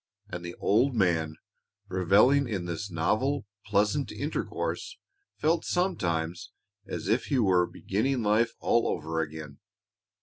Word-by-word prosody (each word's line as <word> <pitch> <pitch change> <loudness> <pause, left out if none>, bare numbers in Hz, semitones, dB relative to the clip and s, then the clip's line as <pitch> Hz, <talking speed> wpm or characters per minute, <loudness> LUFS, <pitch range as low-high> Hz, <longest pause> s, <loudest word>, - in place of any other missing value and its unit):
And 90 -1 -6
the 85 0 -6
old 125 +6 +2
man, 85 -6 +1 0.5
reveling 105 +9 +4
in 95 -5 -2
this 90 +4 -4
novel, 110 - 0 0.2
pleasant 105 +6 +1
intercourse, - - -3 0.4
felt 160 +2 +2
sometimes 85 - -1 0.4
as - - -5
if 110 +5 +2
he 140 - 0
were 95 -6 +3
beginning 120 +5 -1
life 110 +3 +2
all 120 - +2
over 80 +1 -2
again. 75 -2 -7
105 Hz, 125 wpm, -28 LUFS, 85-130 Hz, 0.5 s, reveling